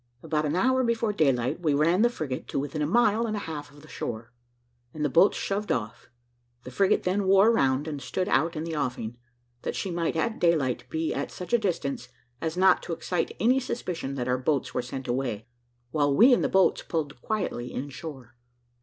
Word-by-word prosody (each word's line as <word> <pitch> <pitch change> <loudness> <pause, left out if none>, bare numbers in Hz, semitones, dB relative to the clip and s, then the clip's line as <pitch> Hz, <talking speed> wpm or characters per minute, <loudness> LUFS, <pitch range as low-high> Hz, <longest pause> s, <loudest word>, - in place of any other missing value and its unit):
About 155 -1 0
an 150 - -1
hour 260 +7 +3
before 230 -2 0
daylight 135 -8 +1
we 155 -5 +1
ran 165 +6 +3
the 240 - +5
frigate 150 - -5
to - - -4
within 145 +2 -3
a 145 - +1
mile 230 +3 +3
and 215 - -2
a - - -2
half 150 -4 -6
of 145 +1 -17
the - - -14
shore, 115 -4 -6 0.6
and 150 -1 -1
the - - +1
boats 170 +8 +4
shoved 205 +1 -2
off; 115 -2 -3 0.5
the 125 - -9
frigate 195 +8 +2
then 190 +2 0
wore 195 +4 +6
round, 135 - +1
and 145 -3 -4
stood 185 +9 -2
out 170 -4 +2
in 155 - -3
the 165 -1 -4
offing, 125 -5 -3 0.5
that - - -3
she 190 - -3
might 170 -1 -1
at 225 +8 -1
daylight 130 -7 +1
be 160 +2 -1
at - - -3
such 180 +6 -7
a 240 - +5
distance 150 - -2 0.3
as 160 +1 -3
not 185 0 +5
to 170 - -4
excite 175 +1 -2
any 250 +4 +4
suspicion 180 - -4
that 125 -2 -3
our 125 0 +1
boats 140 +1 0
were - - 0
sent 130 +2 -7
away, 120 -4 -2 0.5
while 145 -1 +2
we 235 - +6
in - - +3
the - - +1
boats 190 -1 +3
pulled 145 -6 -4
quietly 160 - -3
in 135 - -4
shore. 135 -5 -9
160 Hz, 210 wpm, -27 LUFS, 135-195 Hz, 0.6 s, wore